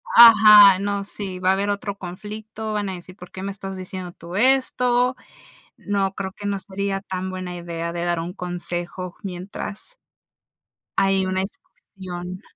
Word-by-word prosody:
Ajá, 215 Hz, -4 st, +10 dB
no, 200 Hz, 0 st, -1 dB
sí. 195 Hz, -2 st, -6 dB
Va 185 Hz, 0 st, +1 dB
a -, -, +4 dB
haber 200 Hz, +1 st, 0 dB
otro 200 Hz, 0 st, -3 dB
conflicto, 215 Hz, +4 st, -7 dB
van 205 Hz, -2 st, -1 dB
a -, -, -3 dB
decir: 180 Hz, +1 st, -11 dB
"¿Por 180 Hz, -3 st, -13 dB
qué 190 Hz, -, -8 dB
me 200 Hz, -, -3 dB
estás 195 Hz, -1 st, -7 dB
diciendo 185 Hz, -1 st, -6 dB
tú 175 Hz, +1 st, -10 dB
esto?". 250 Hz, +1 st, +3 dB, 0.6 s
No, 200 Hz, -1 st, -1 dB
creo 190 Hz, -1 st, -4 dB
que 205 Hz, -, -9 dB
no 200 Hz, -1 st, -1 dB
sería 195 Hz, 0 st, -3 dB
tan 190 Hz, -1 st, -4 dB
buena 185 Hz, -1 st, -5 dB
idea 170 Hz, -1 st, -4 dB
de 170 Hz, 0 st, -3 dB
dar 175 Hz, -1 st, 0 dB
un 170 Hz, +2 st, -5 dB
consejo, 175 Hz, 0 st, -5 dB
mientras 195 Hz, -, -6 dB, 1.0 s
hay 195 Hz, -1 st, +2 dB
una 185 Hz, 0 st, 0 dB
discusión. 185 Hz, -2 st, -9 dB
190 Hz, 165 wpm, -23 LUFS, 180-205 Hz, 1.0 s, Ajá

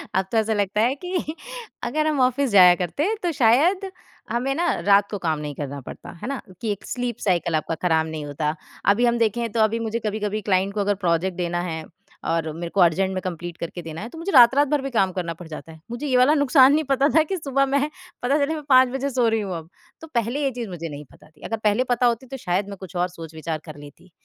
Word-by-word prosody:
अब 190 Hz, 0 st, +2 dB
तो 225 Hz, -, +1 dB
ऐसा 220 Hz, 0 st, +2 dB
लगता 205 Hz, +1 st, 0 dB
है 250 Hz, +4 st, +2 dB
कि 350 Hz, -4 st, -3 dB, 0.5 s
अगर 305 Hz, +6 st, 0 dB
हम 300 Hz, -3 st, 0 dB
ऑफ़िस 255 Hz, +1 st, +2 dB
जाया 180 Hz, -3 st, +8 dB
करते 285 Hz, -, -1 dB
तो 345 Hz, -, +1 dB
शायद 320 Hz, -, +3 dB, 0.4 s
हमें 255 Hz, +3 st, 0 dB
ना 345 Hz, +2 st, 0 dB
रात 200 Hz, 0 st, +4 dB
को 205 Hz, -, -2 dB
काम 160 Hz, -3 st, -1 dB
नहीं 145 Hz, -2 st, -5 dB
करना 140 Hz, -1 st, -5 dB
पड़ता -, -, -10 dB
है -, -, -5 dB
ना, 275 Hz, -2 st, -3 dB, 0.2 s
कि 220 Hz, -2 st, -1 dB
एक 200 Hz, -, -6 dB
स्लीप 245 Hz, -2 st, -3 dB
साइकिल 170 Hz, -3 st, +1 dB
आपका 160 Hz, +1 st, -1 dB
ख़राब 160 Hz, -1 st, +2 dB
नहीं 155 Hz, -2 st, -5 dB
होता। 150 Hz, +2 st, -2 dB, 0.4 s
अभी 240 Hz, +3 st, +1 dB
हम 235 Hz, 0 st, +2 dB
देखे 230 Hz, +1 st, +1 dB
तो -, -, +1 dB
अभी 220 Hz, +1 st, +2 dB
मुझे 230 Hz, +1 st, -2 dB
कभी-कभी 210 Hz, 0 st, -2 dB
क्लाइंट 195 Hz, 0 st, +1 dB
को 205 Hz, -1 st, +1 dB
प्रोजेक्ट 180 Hz, 0 st, 0 dB
देना 175 Hz, 0 st, -1 dB
है 160 Hz, -3 st, -4 dB, 0.5 s
और 160 Hz, -1 st, -1 dB
मेरे 170 Hz, 0 st, -5 dB
को 190 Hz, -, +4 dB
अर्जेंट 190 Hz, +3 st, +3 dB
में 185 Hz, -, -3 dB
कंप्लीट 175 Hz, -1 st, -5 dB
करके 170 Hz, +1 st, -6 dB
देना 160 Hz, +1 st, -7 dB
है, 230 Hz, -, -6 dB
तो 325 Hz, -, -12 dB
मुझे 340 Hz, +5 st, -3 dB
रात-रात 265 Hz, +2 st, +7 dB
भर 295 Hz, -1 st, +1 dB
भी 275 Hz, -, -4 dB
काम 195 Hz, -5 st, +2 dB
करना 170 Hz, -3 st, -3 dB
पड़ 175 Hz, -, -9 dB
जाता 160 Hz, +1 st, -9 dB
है। 160 Hz, -, -14 dB
मुझे 250 Hz, +5 st, -4 dB
ये 255 Hz, -2 st, +2 dB
वाला 260 Hz, +5 st, +5 dB
नुक़सान 275 Hz, -1 st, +5 dB
नहीं 310 Hz, +1 st, +2 dB
पता 275 Hz, +2 st, +3 dB
था 315 Hz, -, +6 dB
कि 375 Hz, +4 st, -3 dB
सुबह 275 Hz, -3 st, +1 dB
मैं 280 Hz, +2 st, 0 dB, 0.3 s
पता 275 Hz, +4 st, +2 dB
चले 315 Hz, +3 st, 0 dB
मैं 305 Hz, -, -6 dB
5 255 Hz, -1 st, +6 dB
बजे 270 Hz, +2 st, -2 dB
सो 250 Hz, -3 st, +1 dB
रही 225 Hz, -1 st, 0 dB
हूँ 185 Hz, -4 st, -4 dB
अब। 160 Hz, +1 st, -10 dB, 0.3 s
तो 320 Hz, -, -9 dB
पहले 235 Hz, +5 st, 0 dB
ये 270 Hz, -, +1 dB
चीज़ 235 Hz, -4 st, -6 dB
मुझे 170 Hz, -2 st, -6 dB
नहीं 145 Hz, 0 st, -8 dB
पता -, -, -19 dB
थी, 155 Hz, -, -26 dB
अगर 225 Hz, -, -2 dB
पहले 210 Hz, +4 st, +3 dB
पता 245 Hz, 0 st, +2 dB
होती 240 Hz, +2 st, 0 dB
तो 270 Hz, +1 st, -7 dB
शायद 195 Hz, -1 st, -1 dB
मैं 200 Hz, -, -7 dB
कुछ 185 Hz, -1 st, -10 dB
और 175 Hz, +1 st, +1 dB
सोच-विचार 160 Hz, -2 st, -6 dB
कर 155 Hz, -2 st, -10 dB
लेती, 145 Hz, +4 st, -14 dB
215 Hz, 250 wpm, -23 LUFS, 175-260 Hz, 0.5 s, जाया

